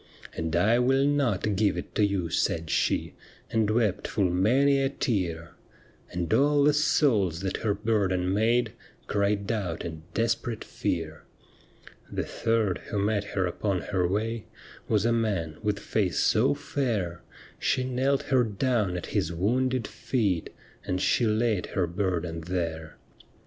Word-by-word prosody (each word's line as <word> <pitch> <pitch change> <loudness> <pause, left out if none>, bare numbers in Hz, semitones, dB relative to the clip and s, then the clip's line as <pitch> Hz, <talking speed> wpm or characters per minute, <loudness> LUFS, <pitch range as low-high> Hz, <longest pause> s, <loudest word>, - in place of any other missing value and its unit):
' - - -16
And 80 0 -2
I 110 +7 +4
will 135 +2 +3
not 120 -8 +1
give 100 -2 +2
it 90 - -6
to 105 - +2
you,' 95 -5 0
said 80 -1 0
she. - - 0 0.4
And 110 -2 +2
wept 110 -4 +1
full 95 -5 +1
many 135 +10 +3
a 135 - +2
tear; 90 - -2 0.6
And 85 -2 -2
all 145 +1 +4
the 150 +1 +5
souls 115 - +2
that 95 0 -2
her 105 -3 0
burden 95 -4 0
made 115 +4 +2 0.3
Cried 100 0 0
out 95 -8 -3
in 80 -2 -6
desperate 115 +1 -1
fear. 80 -2 -3 0.9
The - - -2
third 115 -5 0
who 105 - -3
met 100 0 +1
her 95 -2 +2
upon 90 +1 -1
her 90 -2 +2
way 110 +4 -2 0.4
Was 105 -1 +2
a 120 - +3
man 100 -9 -1
with 105 -1 0
face 95 -6 -1
so - - +3
fair, 105 -11 -2 0.4
She 130 - +1
knelt 130 +2 0
her 130 -1 +5
down 105 -3 0
at 85 - -5
His 80 - 0
wounded 125 +7 0
feet. 100 -10 -1 0.3
And 90 - -2
she 110 +5 +2
laid 110 -3 +1
her 95 - 0
burden 85 -2 -2
there. 80 -4 -3
105 Hz, 150 wpm, -27 LUFS, 90-115 Hz, 0.9 s, the